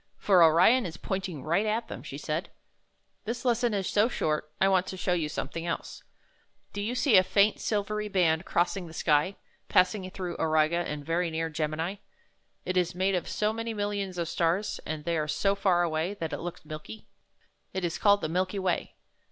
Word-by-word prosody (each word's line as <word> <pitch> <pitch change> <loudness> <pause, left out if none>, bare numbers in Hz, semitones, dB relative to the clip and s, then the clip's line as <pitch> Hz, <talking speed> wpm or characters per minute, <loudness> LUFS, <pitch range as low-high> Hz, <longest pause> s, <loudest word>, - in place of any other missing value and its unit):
"For 190 -3 +4
Orion 180 +9 +5
is 165 -1 -8
pointing 185 -7 -4
right 175 +7 +1
at 225 +2 -1
them," - - -7
she - - -7
said. - - -3 0.8
"This 235 +4 -4
lesson 240 -2 +2
is 195 -2 -1
so 210 +2 +3
short, 150 -9 -2
I 190 - +4
want 190 -1 +2
to 190 - -5
show 180 0 0
you 160 -4 0
something 165 +3 -4
else. 170 - -4 0.7
Do 205 - -3
you 225 +4 -2
see 250 -5 +5
a 185 - +7
faint, 200 +3 +3
silvery 210 0 -1
band 175 -5 +2
crossing 175 +1 0
the 160 - -11
sky, 150 +6 +2 0.3
passing 185 +1 +2
through 180 -2 -5
Auriga, 155 +1 +2
and 150 -4 -4
very 170 +1 0
near 160 0 -2
Gemini? 160 +5 -2 0.7
It 185 0 -1
is 175 0 +1
made 190 +2 +1
of 180 - -1
so 210 +1 0
many 230 0 -4
millions 205 -3 -2
of 170 -1 -1
stars, 170 +5 0
and 155 -1 -4
they 170 -1 0
are 150 - -1
so 195 +6 +1
far 185 -3 +2
away, 165 +4 -1
that 165 -5 -4
it 145 - -3
looks 175 -2 -7
milky. 155 +8 -8 0.7
It 190 -1 -2
is 170 - -3
called 205 0 +4
the - - -1
Milky 185 +4 -1
Way. 185 -2 -1
180 Hz, 195 wpm, -28 LUFS, 165-205 Hz, 0.8 s, a